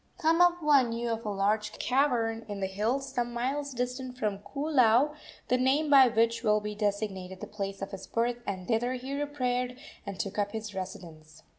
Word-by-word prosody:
Kamapuaa 330 Hz, -4 st, +4 dB
knew 235 Hz, +1 st, -2 dB
of 225 Hz, 0 st, -3 dB
a -, -, 0 dB
large 210 Hz, +2 st, 0 dB
cavern 240 Hz, -4 st, +1 dB
in 205 Hz, -1 st, -4 dB
the 195 Hz, -, 0 dB
hills 235 Hz, +8 st, -2 dB
some 240 Hz, -2 st, -1 dB
miles 275 Hz, +4 st, -2 dB
distant 250 Hz, 0 st, -4 dB
from 210 Hz, -4 st, -1 dB
Koolau, 275 Hz, +1 st, +2 dB, 0.3 s
the 250 Hz, -, +3 dB
name 285 Hz, +4 st, +2 dB
by 270 Hz, -2 st, +9 dB
which 230 Hz, 0 st, +2 dB
will 215 Hz, -2 st, +3 dB
be 210 Hz, 0 st, -5 dB
designated 200 Hz, -3 st, -2 dB
the -, -, -5 dB
place 195 Hz, -2 st, -5 dB
of 195 Hz, -, -6 dB
his 195 Hz, -, -8 dB
birth, 235 Hz, +1 st, 0 dB
and 185 Hz, -2 st, -4 dB
thither 240 Hz, +2 st, +1 dB
he 255 Hz, +2 st, -5 dB
repaired 250 Hz, -4 st, -1 dB, 0.3 s
and 200 Hz, -3 st, -7 dB
took 200 Hz, +1 st, -3 dB
up 205 Hz, +1 st, -1 dB
his 220 Hz, -2 st, -5 dB
residence. 165 Hz, -5 st, -8 dB
230 Hz, 180 wpm, -29 LUFS, 205-260 Hz, 0.3 s, by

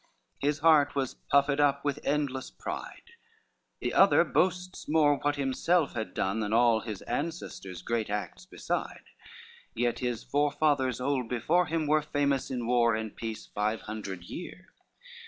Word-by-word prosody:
His 145 Hz, +1 st, +1 dB
heart 155 Hz, -4 st, +5 dB
was 135 Hz, -2 st, -1 dB, 0.2 s
puffed 140 Hz, 0 st, +3 dB
up 140 Hz, -1 st, +2 dB
with 145 Hz, 0 st, 0 dB
endless 140 Hz, -2 st, -1 dB
pride: -, -, -7 dB, 0.7 s
The -, -, -2 dB
other -, -, +6 dB
boasts 180 Hz, -2 st, -1 dB
more 150 Hz, -2 st, +4 dB
what 145 Hz, 0 st, 0 dB
himself 145 Hz, +4 st, +1 dB
had 110 Hz, -2 st, -5 dB
done 100 Hz, +4 st, 0 dB
Than 105 Hz, -1 st, -2 dB
all 115 Hz, -1 st, +4 dB
his 110 Hz, -3 st, -7 dB
ancestors' 145 Hz, -, -5 dB
great 115 Hz, -2 st, -1 dB
acts 105 Hz, 0 st, -4 dB
beside; -, -, -4 dB, 0.7 s
Yet 120 Hz, +1 st, 0 dB
his 120 Hz, -2 st, -2 dB
forefathers 145 Hz, -3 st, +1 dB
old 130 Hz, -2 st, -1 dB
before 165 Hz, +8 st, +2 dB
him 160 Hz, 0 st, -1 dB
were 155 Hz, +1 st, +3 dB
Famous 145 Hz, -2 st, 0 dB
in 125 Hz, -3 st, -3 dB
war 120 Hz, -1 st, +3 dB
and 110 Hz, -1 st, -5 dB
peace 110 Hz, -1 st, -5 dB
five 105 Hz, +2 st, -2 dB
hundred 100 Hz, -5 st, -6 dB
years. 180 Hz, -, -8 dB
135 Hz, 150 wpm, -29 LUFS, 115-150 Hz, 0.7 s, other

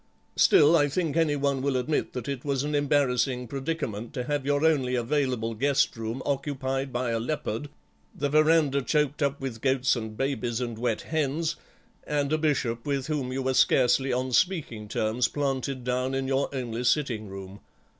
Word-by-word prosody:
Still, 150 Hz, +3 st, +6 dB
I 145 Hz, -3 st, +4 dB
think 160 Hz, 0 st, -1 dB
any 160 Hz, -3 st, +2 dB
one 140 Hz, -1 st, 0 dB
will 135 Hz, -1 st, 0 dB
admit 130 Hz, +4 st, -1 dB
that 125 Hz, -3 st, -5 dB
it 140 Hz, -3 st, -4 dB
was 140 Hz, -2 st, -1 dB
an 150 Hz, +1 st, -2 dB
embarrassing 135 Hz, -3 st, +1 dB
predicament 135 Hz, -5 st, -4 dB
to 125 Hz, -, -2 dB
have 145 Hz, +1 st, -2 dB
your 145 Hz, +2 st, +2 dB
only 135 Hz, -6 st, +2 dB
available 125 Hz, -2 st, 0 dB
guest 135 Hz, +5 st, +1 dB
room 115 Hz, +3 st, -4 dB
occupied 135 Hz, -1 st, -2 dB
by 125 Hz, -1 st, -1 dB
a 115 Hz, -, 0 dB
leopard, 145 Hz, +1 st, -3 dB, 0.5 s
the 145 Hz, -, -1 dB
verandah 155 Hz, -1 st, +3 dB
choked 150 Hz, +2 st, 0 dB
up 140 Hz, 0 st, 0 dB
with 125 Hz, -4 st, -5 dB
goats 130 Hz, -1 st, +2 dB
and 110 Hz, -2 st, -6 dB
babies 125 Hz, -4 st, -1 dB
and 120 Hz, -3 st, -4 dB
wet 120 Hz, -2 st, 0 dB
hens, 155 Hz, +1 st, -1 dB, 0.5 s
and 145 Hz, 0 st, -1 dB
a 155 Hz, -, +2 dB
Bishop 125 Hz, -7 st, 0 dB
with 140 Hz, -2 st, -1 dB
whom 145 Hz, -5 st, -2 dB
you 135 Hz, +1 st, -2 dB
were 130 Hz, 0 st, +1 dB
scarcely 130 Hz, +1 st, +3 dB
on 130 Hz, +1 st, -1 dB
speaking 125 Hz, -, 0 dB
terms 110 Hz, +3 st, 0 dB
planted 135 Hz, -2 st, -2 dB
down 125 Hz, +1 st, -1 dB
in 135 Hz, 0 st, -1 dB
your 135 Hz, +1 st, +1 dB
own 125 Hz, -3 st, -3 dB
sitting 120 Hz, -5 st, +1 dB
room. 95 Hz, +1 st, -9 dB
135 Hz, 175 wpm, -27 LUFS, 125-145 Hz, 0.5 s, Still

